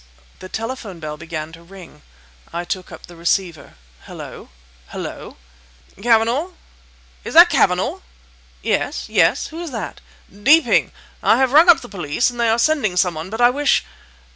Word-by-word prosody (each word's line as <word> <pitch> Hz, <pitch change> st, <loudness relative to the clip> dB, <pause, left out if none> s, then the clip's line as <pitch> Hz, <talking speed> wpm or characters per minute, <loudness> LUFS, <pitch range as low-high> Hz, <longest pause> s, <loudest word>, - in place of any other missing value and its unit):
The 185 Hz, -, -10 dB
telephone 225 Hz, -5 st, -6 dB
bell 155 Hz, -1 st, -6 dB
began 160 Hz, -1 st, -7 dB
to 165 Hz, +1 st, -14 dB
ring. 180 Hz, -, -14 dB, 0.5 s
I 170 Hz, +1 st, -4 dB
took 185 Hz, 0 st, -5 dB
up -, -, -11 dB
the 175 Hz, -, -14 dB
receiver. 170 Hz, -1 st, -2 dB, 0.3 s
"Hullo! -, -, -10 dB, 0.4 s
Hullo." -, -, -8 dB, 0.6 s
"Cavanagh!—is 210 Hz, -, -2 dB
that -, -, +9 dB
Cavanagh?" -, -, +1 dB, 0.6 s
"Yes! -, -, -2 dB
yes! -, -, +2 dB
who 325 Hz, +2 st, -8 dB
is 345 Hz, -, -5 dB
that?" 230 Hz, -5 st, -6 dB, 0.3 s
"Deeping! 255 Hz, +7 st, +3 dB, 0.3 s
I -, -, +4 dB
have 265 Hz, -1 st, +2 dB
rung 320 Hz, +5 st, +6 dB
up 345 Hz, -, +7 dB
the -, -, -10 dB
police, 190 Hz, +4 st, -1 dB
and 240 Hz, -, -11 dB
they 235 Hz, -1 st, +2 dB
are 225 Hz, -, +2 dB
sending 235 Hz, -8 st, +1 dB
some 180 Hz, -1 st, +2 dB
one. 160 Hz, +3 st, -7 dB
But 225 Hz, +3 st, -4 dB
I 240 Hz, 0 st, +6 dB
wish..." 285 Hz, -, +1 dB
195 Hz, 155 wpm, -19 LUFS, 165-245 Hz, 0.6 s, that